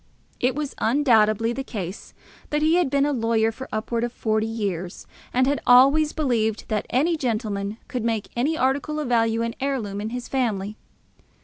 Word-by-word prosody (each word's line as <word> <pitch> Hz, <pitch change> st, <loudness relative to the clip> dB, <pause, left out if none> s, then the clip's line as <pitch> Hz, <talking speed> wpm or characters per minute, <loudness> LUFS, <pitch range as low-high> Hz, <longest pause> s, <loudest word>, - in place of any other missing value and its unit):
It 250 Hz, +1 st, +1 dB
was 295 Hz, -2 st, -3 dB
undoubtedly 225 Hz, -3 st, +3 dB
the 270 Hz, -, -4 dB
case 195 Hz, -7 st, -7 dB, 0.3 s
that 300 Hz, 0 st, 0 dB
he 315 Hz, +1 st, +4 dB
had 355 Hz, -6 st, +2 dB
been 280 Hz, +1 st, +2 dB
a 290 Hz, -, 0 dB
lawyer 225 Hz, -2 st, +1 dB
for 260 Hz, +4 st, -9 dB
upwards 225 Hz, +2 st, -2 dB
of 240 Hz, -, -5 dB
forty 220 Hz, -2 st, 0 dB
years, 195 Hz, -6 st, -4 dB, 0.3 s
and 255 Hz, +1 st, +3 dB
had 280 Hz, +2 st, 0 dB
always 275 Hz, +5 st, +6 dB
believed 230 Hz, -8 st, -1 dB
that 215 Hz, -2 st, -1 dB
any 310 Hz, +7 st, +2 dB
gentleman 215 Hz, -6 st, -2 dB
could 250 Hz, -3 st, -3 dB
make 225 Hz, -2 st, -1 dB
any 290 Hz, +7 st, 0 dB
article 285 Hz, +4 st, 0 dB
of 295 Hz, -5 st, -3 dB
value 230 Hz, -1 st, +2 dB
an 230 Hz, 0 st, -2 dB
heirloom 230 Hz, -8 st, -2 dB
in 215 Hz, -, -3 dB
his 245 Hz, +1 st, -5 dB
family. 215 Hz, -6 st, -1 dB
235 Hz, 180 wpm, -24 LUFS, 220-270 Hz, 0.3 s, always